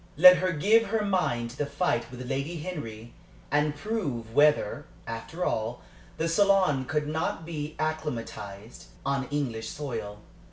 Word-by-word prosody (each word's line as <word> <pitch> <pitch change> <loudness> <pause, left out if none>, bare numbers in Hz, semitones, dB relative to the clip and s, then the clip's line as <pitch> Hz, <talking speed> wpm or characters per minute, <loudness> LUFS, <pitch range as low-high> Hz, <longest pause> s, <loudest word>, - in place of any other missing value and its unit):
Let 180 +3 +10
her 185 +1 +1
give 210 +8 +4
her 215 0 0
mind 140 -12 0
to 125 - -13
the 145 - +1
fight 140 -8 0
with 125 0 -8
Lady 140 +6 -2
Henry, 115 -9 -6 0.4
and 150 +1 +2
prove 145 - -3
whether, 150 +1 +3 0.2
after 115 +10 -4
all, 115 +2 -2 0.3
the 165 - 0
salon 185 -6 +3
could 150 +2 -1
not 160 +1 -2
be 155 -2 -5
acclimatized 120 -9 -4 0.2
on 135 -1 0
English 120 -6 -2
soil. 115 -8 -5
145 Hz, 145 wpm, -28 LUFS, 120-165 Hz, 0.4 s, Let